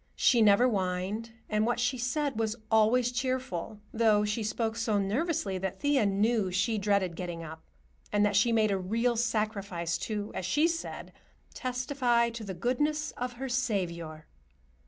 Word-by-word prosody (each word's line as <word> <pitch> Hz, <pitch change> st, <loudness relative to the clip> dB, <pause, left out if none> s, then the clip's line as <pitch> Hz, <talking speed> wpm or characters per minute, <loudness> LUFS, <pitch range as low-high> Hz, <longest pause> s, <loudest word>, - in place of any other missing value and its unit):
She 240 Hz, -3 st, +4 dB
never 210 Hz, +3 st, +6 dB
whined, 195 Hz, 0 st, -1 dB, 0.2 s
and 215 Hz, 0 st, +1 dB
what 240 Hz, +2 st, 0 dB
she 245 Hz, +1 st, 0 dB
said 275 Hz, 0 st, -1 dB
was 220 Hz, -1 st, 0 dB, 0.2 s
always 230 Hz, +3 st, +4 dB
cheerful, 250 Hz, -6 st, -3 dB, 0.2 s
though 220 Hz, -2 st, +3 dB
she 210 Hz, +2 st, -1 dB
spoke 220 Hz, +1 st, -1 dB
so 225 Hz, -2 st, 0 dB
nervously 205 Hz, -, -1 dB
that 190 Hz, 0 st, -4 dB
Thea 285 Hz, -7 st, +2 dB
knew 205 Hz, +1 st, +1 dB
she 195 Hz, +4 st, 0 dB
dreaded 200 Hz, -4 st, +1 dB
getting 175 Hz, -1 st, -5 dB
up, 160 Hz, 0 st, -9 dB, 0.5 s
and 205 Hz, 0 st, +3 dB
that 205 Hz, -1 st, +1 dB
she 225 Hz, +4 st, +4 dB
made 220 Hz, -2 st, +3 dB
a 195 Hz, -, 0 dB
real 230 Hz, +6 st, 0 dB
sacrifice 210 Hz, -7 st, -1 dB
to, 210 Hz, -2 st, -4 dB
as 185 Hz, -, -3 dB
she 295 Hz, -, +3 dB
said, 330 Hz, -1 st, -5 dB, 0.4 s
"testify 250 Hz, -2 st, 0 dB
to 230 Hz, -1 st, -7 dB
the 190 Hz, -3 st, -5 dB
goodness 295 Hz, -, 0 dB
of 250 Hz, 0 st, -5 dB
her 265 Hz, +2 st, -5 dB
Saviour." 175 Hz, -11 st, -2 dB
220 Hz, 160 wpm, -29 LUFS, 195-245 Hz, 0.5 s, never